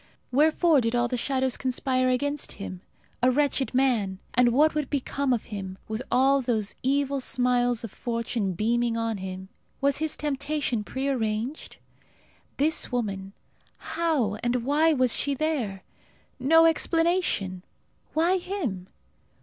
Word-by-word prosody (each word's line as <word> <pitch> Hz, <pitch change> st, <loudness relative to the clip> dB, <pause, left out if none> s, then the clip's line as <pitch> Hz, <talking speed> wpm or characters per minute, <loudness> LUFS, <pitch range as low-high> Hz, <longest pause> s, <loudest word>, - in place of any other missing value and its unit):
Wherefore 310 Hz, +2 st, +4 dB
did 230 Hz, 0 st, 0 dB
all 240 Hz, 0 st, +2 dB
the 250 Hz, -, -2 dB
shadows 260 Hz, 0 st, 0 dB
conspire 255 Hz, 0 st, 0 dB
against 285 Hz, +3 st, -1 dB
him, 185 Hz, -2 st, -7 dB, 0.4 s
a 250 Hz, -, +5 dB
wretched 275 Hz, 0 st, +1 dB
man; 230 Hz, -8 st, +2 dB, 0.2 s
and 245 Hz, 0 st, +4 dB
what 300 Hz, +6 st, +4 dB
would 300 Hz, -3 st, -2 dB
become 280 Hz, -1 st, -1 dB
of 240 Hz, -3 st, +1 dB
him, 190 Hz, -2 st, -5 dB
with 220 Hz, +2 st, -3 dB
all 270 Hz, +2 st, +4 dB
those 225 Hz, -5 st, -1 dB
evil 275 Hz, +1 st, +1 dB
smiles 245 Hz, -2 st, +1 dB
of 230 Hz, -, -6 dB
fortune 230 Hz, -4 st, -2 dB
beaming 230 Hz, +4 st, 0 dB
on 230 Hz, -1 st, -1 dB
him? 190 Hz, 0 st, -7 dB, 0.3 s
Was 280 Hz, 0 st, +2 dB
his 315 Hz, -1 st, 0 dB
temptation 285 Hz, -5 st, -1 dB
prearranged? 255 Hz, 0 st, -3 dB, 0.8 s
This 305 Hz, +1 st, +1 dB
woman, 200 Hz, -5 st, -3 dB, 0.4 s
how 300 Hz, -11 st, -1 dB
and 240 Hz, 0 st, 0 dB
why 305 Hz, +4 st, +3 dB
was 255 Hz, -5 st, +2 dB
she 285 Hz, -1 st, 0 dB
there? 255 Hz, -11 st, -2 dB, 0.6 s
No 325 Hz, +5 st, +5 dB
explanation! 330 Hz, -, +1 dB, 0.5 s
Why 345 Hz, +4 st, +3 dB
him? 290 Hz, -, -4 dB
255 Hz, 135 wpm, -26 LUFS, 230-285 Hz, 0.8 s, a